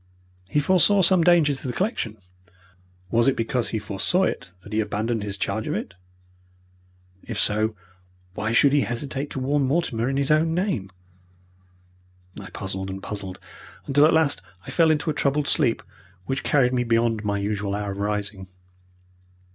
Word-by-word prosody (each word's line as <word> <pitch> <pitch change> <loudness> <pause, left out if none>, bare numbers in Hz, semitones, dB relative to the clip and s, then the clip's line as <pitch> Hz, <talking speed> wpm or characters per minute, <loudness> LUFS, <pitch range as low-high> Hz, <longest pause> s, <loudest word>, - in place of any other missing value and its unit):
He 150 - +2
foresaw 185 +5 +4
some 185 -1 +5
danger 165 -4 +4
to 135 - -7
the 125 - -3
collection. 130 - -2 0.9
Was 115 +1 +3
it 135 - +3
because 115 +1 -1
he 110 - -3
foresaw 105 - 0
it 95 - -2
that 105 - -10
he 110 - +1
abandoned 110 +2 -1
his 100 -1 -4
charge 100 +3 -2
of - - -1
it? - - -5 1.3
But - - -23
if 115 - -3
so, 110 +1 +2 0.6
why 110 +3 -2
should 135 +4 +4
he 145 - +4
hesitate 135 +3 -3
to - - -5
warn 140 +3 +1
Mortimer 130 -4 0
in 135 - -1
his 140 +1 +1
own 160 +2 +3
name? 175 - -1 1.5
I - - -9
puzzled 95 0 -5
and 95 0 -7
puzzled 95 -3 -6 0.5
until 145 +2 +5
at - - +3
last 160 -3 +2 0.2
I - - -7
fell 165 -2 +4
into 155 0 +1
a - - -3
troubled 145 +1 0
sleep, 130 -8 +2 0.4
which 135 +4 -2
carried 130 -3 +2
me 125 -1 +1
beyond 115 -2 +1
my 100 -1 -1
usual 100 0 -2
hour 100 -1 -3
of 100 - -7
rising. 100 -2 -3
120 Hz, 170 wpm, -24 LUFS, 105-145 Hz, 1.5 s, some